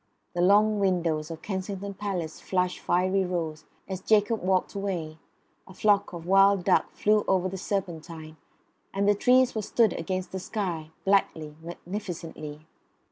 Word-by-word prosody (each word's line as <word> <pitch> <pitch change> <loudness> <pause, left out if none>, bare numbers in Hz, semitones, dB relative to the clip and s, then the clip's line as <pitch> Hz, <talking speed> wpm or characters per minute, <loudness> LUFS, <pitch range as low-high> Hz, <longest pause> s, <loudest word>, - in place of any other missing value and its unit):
The 175 - -1
long 210 +3 +4
windows 170 -5 0
of 165 -1 -8
Kensington 195 0 -4
Palace 185 -5 -4
flushed 180 -1 -1
fiery 185 +2 +1
rose 165 -4 -3 0.2
as 190 -1 -5
Jacob 215 +2 +2
walked 185 0 +1
away; 175 -6 -4 0.5
a 190 - -13
flock 205 -1 +2
of 170 -1 -8
wild 195 0 +5
duck - - +3
flew 210 0 +2
over 185 -1 +2
the 190 - -5
Serpentine; 165 -5 -4 0.6
and 200 +1 +1
the 205 - +6
trees 250 +4 +4
were 220 - -2
stood 220 0 +2
against 185 +2 -3
the 190 - -4
sky, 180 -6 -3 0.2
blackly, 160 -6 +1
magnificently. 170 -4 -7
185 Hz, 145 wpm, -27 LUFS, 170-200 Hz, 0.6 s, the